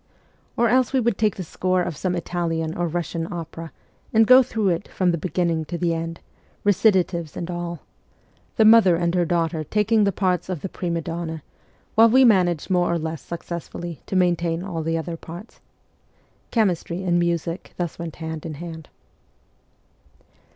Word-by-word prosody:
Or 235 - +4
else 255 +3 +2
we 265 - +3
would 235 -4 0
take 215 -2 +2
the 185 - -5
score 185 +2 0
of 175 -3 -4
some 180 +4 -2
Italian 165 -2 -2
or 175 -1 -1
Eussian 165 0 -3
opera 165 -1 -7 0.4
and 225 0 +5
go 255 +3 +8
through 220 -5 0
it 175 +2 -1
from 185 -2 +1
the 170 - 0
beginning 170 -1 0
fco 170 +2 -5
the 170 -2 +1
end, 165 0 -4 0.4
recitatives 185 -5 +2
and 175 +1 -4
all 175 -1 -5 0.7
the 220 - +4
mother 215 -5 +7
and 170 0 0
her 175 -1 +2
daughter 165 -2 0
taking 210 +6 +2
the 200 - +3
parts 185 -1 0
of 180 -6 -3
the 195 - -4
prime 170 -2 -2
donne, 165 -2 -5 0.5
while 225 +1 +6
we 260 +3 +6
managed 180 -7 +3
more 180 -1 +3
or - - +1
rather 170 -2 -2
less 160 -3 -4
successfully 170 0 -6
to - - -3
maintain 175 -2 +1
all 180 -4 -4
other 165 +1 -2
parts. 175 +7 -11 0.9
Chemistry 185 -5 0
and 175 -1 +2
music 170 0 -2
thus 175 -2 -4
went 170 -2 -6
hand 160 -1 -6
in 160 -2 -6
hand. 160 0 -8
175 Hz, 170 wpm, -23 LUFS, 165-190 Hz, 0.9 s, go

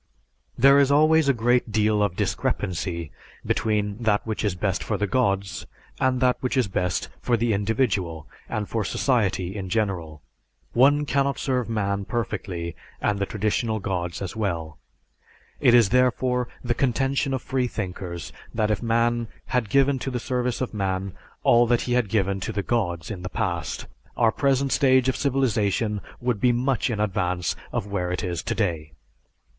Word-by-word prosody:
'" - - -46
There 140 +3 +7
is 140 0 +4
always 155 0 +5
a - - +7
great 120 -1 +1
deal 105 0 +2
of 100 -4 +1
discrepancy 85 -4 -2 0.3
between 105 0 0
that 105 -3 +1
which 110 -1 -3
is 100 -4 0
best 90 - -1
for - - -1
the 105 - 0
gods 100 -3 0 0.3
and 130 -1 +2
that 125 -1 +3
which 130 +1 -1
is 125 -5 +3
best 90 -3 -1
for 120 - +1
the 115 0 +1
individual 100 - 0 0.2
and 105 -1 -2
for 110 -2 -1
society 95 -5 0
in 95 -3 -5
general. 90 -8 -2 0.5
One 145 +4 +4
cannot 140 -1 +1
serve 125 -4 -1
man 100 -3 -1
perfectly 90 -7 -3 0.2
and 105 -1 0
the 100 - -1
traditional 110 +1 -1
gods 90 -2 -3
as 95 - -5
well. 85 -8 -3 0.8
It 120 - +5
is, 115 -5 +6
therefore, 125 0 +2 0.2
the 120 -1 +1
contention 135 +2 0
of 130 -2 -2
freethinkers 95 - -3 0.2
that 110 -1 +1
if 105 - -1
man 115 0 +1 0.3
had 125 -4 +1
given 140 +2 +3
to 135 - -3
the 125 -2 -2
service 125 0 -2
of 130 - -2
man 95 -2 -2 0.3
all 120 0 +5
that 120 0 +2
he 125 - -1
had 120 -4 +1
given 100 -2 +1
to 95 - -3
the 100 -2 -2
gods 90 -7 -1
in 95 -4 -6
the 90 - -5
past, 85 -9 -2 0.3
our 115 -2 +4
present 135 +1 +1
stage 130 -2 +4
of 130 - 0
civilization 110 -6 0 0.2
would 120 -4 -1
be 125 - +5
much 125 +1 0
in 110 -3 -2
advance 90 -4 0 0.2
of - - -2
where 95 -3 -2
it 90 - -2
is 85 -2 -2
today. 80 -8 -2
110 Hz, 170 wpm, -24 LUFS, 95-125 Hz, 0.8 s, There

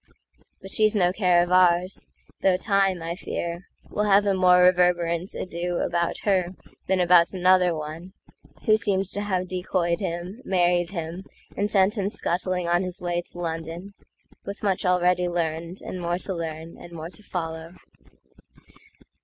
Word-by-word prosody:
But 190 - -9
she's 215 0 +3
no 180 -3 +3
care 180 -4 +3
of 175 - -5
ours, 180 0 +3 0.3
though 185 -1 +3
Time, 195 -3 +1
I 165 +1 -3
fear, 170 0 -5 0.2
Will 210 - -1
have 200 0 +4
a 200 - +2
more 180 -1 +5
reverberant 180 -1 +2
adoAbout 170 -1 -2
her 185 -3 +1 0.3
than 190 0 +2
about 175 0 +5
another 180 0 +4
oneWho 175 - -4
seems 195 -3 0
to 205 - -1
have 185 -3 -1
decoyed 180 -2 -1
him, 180 +4 -5
married 175 -2 +2
him, 170 0 -5 0.3
And 205 +1 0
sent 205 +1 +2
him 195 0 0
scuttling 180 -2 -2
on 175 +1 +2
his 185 -1 -5
way 175 -1 -1
to 175 - -8
London,—With 170 +4 -8
much 195 -3 0
already 180 0 +2
learned, 170 +1 -3
and 185 - -6
more 175 0 -1
to 190 +1 -5
learn, 165 -1 -6
And 175 - -12
more 165 +1 -7
to 210 - -15
follow. 165 -3 -5
180 Hz, 150 wpm, -25 LUFS, 170-190 Hz, 0.3 s, more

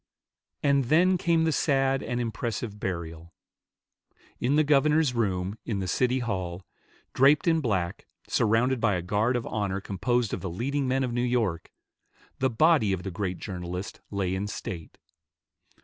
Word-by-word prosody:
And 140 -2 +3
then 175 +8 +4
came 170 -2 +2
the 160 - +2
sad 135 -3 +1
and 120 - -3
impressive 115 -2 -3
burial. 85 -3 -5 1.0
In 130 +4 +1
the 155 - +5
governor's 150 0 +3
room 100 -3 -1
in 110 -4 -3
the 95 -1 -3
City 125 +7 +1
Hall, 95 -7 -3 0.5
draped 140 +5 +4
in 165 -1 +3
black, 95 - -2 0.2
surrounded 120 +3 +2
by 105 -4 +3
a 85 - -2
guard 105 +7 +1
of 120 - -2
honor 100 -3 -2
composed 115 +4 -1
of - - -3
the 95 - -4
leading 135 +10 -2
men 130 +1 +1
of 125 -2 -2
New 120 - 0
York, 115 -10 -1 0.7
the 130 - +2
body 130 - +3
of 90 -1 -3
the 95 - -4
great 90 0 -3
journalist 90 0 -6
lay 95 -3 -1
in 95 +2 -2
state. 85 -5 -7
115 Hz, 160 wpm, -27 LUFS, 95-135 Hz, 1.0 s, the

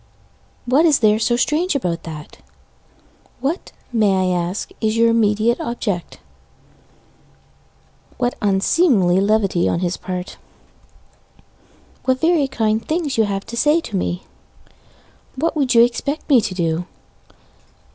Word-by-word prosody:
What 265 +6 +3
is 310 -4 +4
there 215 -1 +3
so 240 +1 +1
strange 310 +7 0
about 175 -11 -2
that? 150 -1 -10 1.0
What, 285 +8 -3 0.2
may 190 -5 +2
I - - 0
ask, 175 +3 -3
is 220 0 0
your 230 0 +4
immediate 225 +1 +2
object? 205 -7 -4 2.0
What 245 -1 0
unseemly 195 - +3
levity 200 -4 +1
on 170 - -1
his 180 -1 -1
part 180 0 -6 1.7
What 260 0 +1
very 320 -3 +2
kind 220 -3 -1
things 310 -3 -2
you 220 -2 +2 0.3
say 295 +7 +3
to 235 -11 -7
me 180 -1 -2 1.1
What 325 +6 -1
would 270 -5 +1
you 230 - +8
expect 250 +5 -2
me 260 -5 +6
to 195 -3 -4
do? 170 0 -1
225 Hz, 120 wpm, -19 LUFS, 190-270 Hz, 2.0 s, you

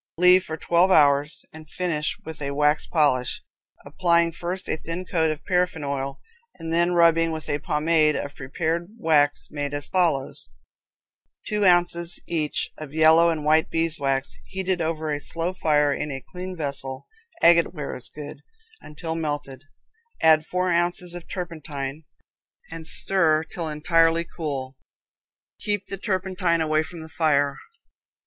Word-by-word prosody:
Leave 180 +1 +6
for 160 -3 -6
12 170 +4 +2
hours 145 -3 +3
and 155 -1 -12
finish 165 -4 -1
with 160 -2 -8
a 140 - -2
wax 150 +1 +1
polish, 145 -6 +1 0.4
applying 170 -2 +2
first 175 +3 -4
a - - 0
thin 165 +3 -5
coat 160 -3 +1
of 155 0 -5
paraffine 180 -4 0
oil 140 -1 -3 0.4
and 165 0 -5
then 170 +1 +2
rubbing 165 -1 +4
with 155 -1 -6
a 145 - -1
pomade 155 +1 +2
of 140 - -4
prepared 160 +5 -3
wax 145 -7 +2
made 145 -1 -3
as 145 - -3
follows: 160 - -1 1.0
Two 210 -1 0
ounces 175 -1 +2
each 155 -3 -2
of 155 -1 -9
yellow 160 +1 +6
and 155 -3 -2
white 155 +1 +3
beeswax 145 -5 0
heated 190 -2 -2
over 160 -1 -2
a 145 - -1
slow 165 +4 -2
fire 150 -5 +2
in 150 - -3
a 135 -1 -4
clean 180 +5 -8
vessel 140 -3 -5 0.4
(agate 170 0 +6
ware 150 -5 -5
is 125 - -6
good) 150 0 -9 0.4
until 160 +2 -6
melted. 145 -4 -4 0.5
Add 160 -1 +4
4 180 0 0
oz. 175 +1 -1
turpentine 155 -5 -5 0.7
and 165 -1 -5
stir 160 -5 +3
till 165 0 -6
entirely 165 +2 +2
cool. 140 -6 -5 0.8
Keep 205 -2 -2
the 195 - -6
turpentine 185 -4 0
away 155 -1 +2
from 165 +1 -8
the 160 - -9
fire. 145 -3 +1
160 Hz, 145 wpm, -24 LUFS, 150-170 Hz, 1.0 s, Leave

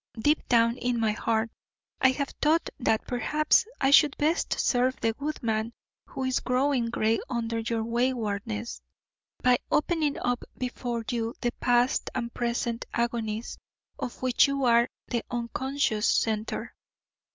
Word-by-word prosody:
Deep 295 +7 +3
down 230 0 +3
in 245 -1 -1
my 220 -1 +2
heart 225 +1 -1 0.5
I 260 - +6
have 275 +1 -1
thought 315 +2 +2
that 225 -3 +1
perhaps 300 - +2
I 270 0 +3
should 290 -1 +6
best 315 +4 0
serve 255 +1 +2
the 225 - +1
good 290 +4 -5
man 220 0 -1 0.3
who 265 - -5
is 260 0 +1
growing 255 -1 +1
grey 225 -1 +1
under 230 -2 -2
your 225 0 -1
waywardness, 210 - -2 0.6
by 250 -1 +4
opening 305 -2 +1
up 245 0 -1
before 245 -2 -3
you 230 -1 -2
the 240 - +1
past 245 +1 +2
and 235 -1 -3
present 235 -1 -2
agonies 230 -1 -2 0.4
of 245 - -5
which 255 +2 +4
you 275 0 -1
are 235 0 +4 0.2
the 235 -2 -2
unconscious 240 -1 -1
centre. 220 +1 -1
240 Hz, 140 wpm, -27 LUFS, 230-260 Hz, 0.6 s, I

